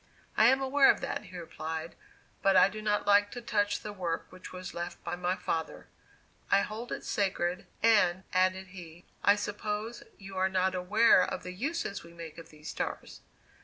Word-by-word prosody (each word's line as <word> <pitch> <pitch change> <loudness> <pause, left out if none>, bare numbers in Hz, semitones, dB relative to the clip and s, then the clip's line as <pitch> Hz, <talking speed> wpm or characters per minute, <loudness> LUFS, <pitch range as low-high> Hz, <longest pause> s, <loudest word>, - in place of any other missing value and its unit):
"I 220 - +6
am 265 +2 +4
aware 270 +1 +5
of - - +4
that," - - -3
he 185 - -10
replied; 160 -1 -5 0.5
"but 195 -1 +4
I 185 +1 +7
do 215 +1 -7
not 210 -1 0
like 205 0 +5
to 245 - -5
touch 205 -3 0
the 210 - -6
work 175 -4 -3
which 185 0 -11
was 185 0 -7
left 170 0 -6
by - - -3
my 180 +1 -1
father. 160 -4 -3 0.6
I 200 - +5
hold 220 +4 -5
it - - -5
sacred; 185 -3 -1 0.2
and," 205 -5 +4
added 185 +1 +1
he, 175 -2 -11 0.2
"I 200 - +6
suppose 210 +2 -4 0.2
you 195 -1 -10
are 190 0 +2
not 190 0 +1
aware 200 +3 +5
of - - -4
the 180 - -6
uses 265 - -3
we 170 0 -14
make 165 -1 -9
of 165 - -12
these 155 0 -10
stars?" - - -5
190 Hz, 190 wpm, -30 LUFS, 175-210 Hz, 0.6 s, I